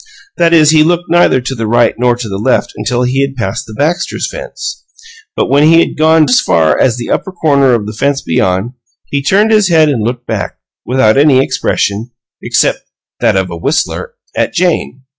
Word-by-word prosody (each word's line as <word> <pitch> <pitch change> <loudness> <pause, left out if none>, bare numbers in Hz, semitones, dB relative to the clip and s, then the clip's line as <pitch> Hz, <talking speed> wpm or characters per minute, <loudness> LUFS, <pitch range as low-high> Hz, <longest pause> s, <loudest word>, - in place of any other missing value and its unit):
That 170 -1 +2
is, 155 -2 +5
he 155 -1 +4
looked 175 +2 -1
neither 175 -6 +3
to 130 +2 -5
the 115 -3 -4
right 120 +2 +2
nor 120 0 +1
to 120 -1 -6
the 95 -1 -5
left 105 - 0
until 125 0 -2
he 130 +2 0
had 140 0 -2
passed 115 -3 -4
the 110 - -10
Baxters' 160 - -2
fence. - - -7 0.5
But - - 0
when 140 +1 +2
he 160 +2 +5
had - - 0
gone 160 0 +3
as 125 - +3
far 80 -1 +2
as 125 -2 +2
the 120 - -5
upper 190 - -2
corner 140 -7 +2
of 110 -3 -3
the 105 - -6
fence 140 +5 -1
beyond, 95 +4 -1 0.3
he 140 - -3
turned 200 +10 +2
his 210 -3 +3
head 160 -3 +3
and 130 -6 -1
looked 120 +2 -3
back, - - -4 0.3
without 125 -3 +2
any 140 -3 +4
expression 110 -4 -1 0.3
except - - 0 0.4
that - - +1
of 95 -2 -2
a - - -5
whistler 160 - -2 0.2
at - - -1
Jane. 170 -7 -1
135 Hz, 200 wpm, -12 LUFS, 115-160 Hz, 0.5 s, is